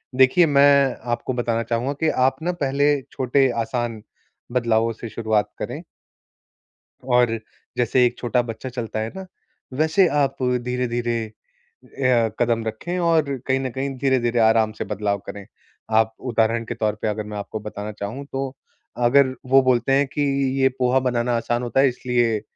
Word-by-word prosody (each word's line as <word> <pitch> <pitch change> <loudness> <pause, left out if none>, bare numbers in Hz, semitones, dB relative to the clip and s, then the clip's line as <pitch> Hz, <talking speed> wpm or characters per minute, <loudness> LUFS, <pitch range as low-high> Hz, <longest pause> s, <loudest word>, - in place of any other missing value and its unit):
देखिए, 130 +7 +5
मैं 140 -2 +4 0.2
आपको 120 +2 -2
बताना 115 -1 -1
चाहूँगा 120 +4 -1
कि 160 - +2
आप 130 +1 +2
ना 175 - 0
पहले 145 +1 +2
छोटे, 130 +1 +2
आसान 115 -1 -3 0.5
बदलावों 115 -2 +1
से 115 +1 -8
शुरुआत 110 -2 0
करें। - - -5 1.2
और 125 -3 +2 0.4
जैसे 125 +1 +3
एक 120 0 -1
छोटा 125 0 +1
बच्चा 120 +2 -6
चलता 115 -3 -4
है 110 +1 -3
ना, 190 0 -7 0.5
वैसे 160 +6 +3
आप 140 -2 +1
धीरे-धीरे 120 -2 -1 0.6
अ, 125 -4 +1
कदम 115 -1 +1
रखें 135 +12 -4
और 160 -5 +1
कहीं 135 0 +2
न 130 -1 -2
कहीं, 135 +2 -3
धीरे-धीरे, 125 -3 +1
आराम 110 -1 +4
से - - -5
बदलाव 100 0 -2
करें। 100 -1 -8 0.5
आप 110 0 +3
उदाहरण 115 -2 0
के 120 - -4
तौर 110 -2 -1
पे - - -1
अगर 105 0 -2
मैं 105 -1 -6
आपको 105 +1 -5
बताना 105 0 -6
चाहूँ, 105 +7 -6
तो 135 0 -4 0.4
अगर 130 +2 +4
वो 135 +1 +5
बोलते 130 0 +2
हैं 140 +1 +4
कि, 140 +2 -4 0.4
"ये 130 - +5
पोहा 125 +1 +3
बनाना 120 0 0
आसान 120 +1 -1
होता 120 +2 0
है 135 - +6
इसलिए 120 -3 0
125 Hz, 160 wpm, -22 LUFS, 115-135 Hz, 1.2 s, है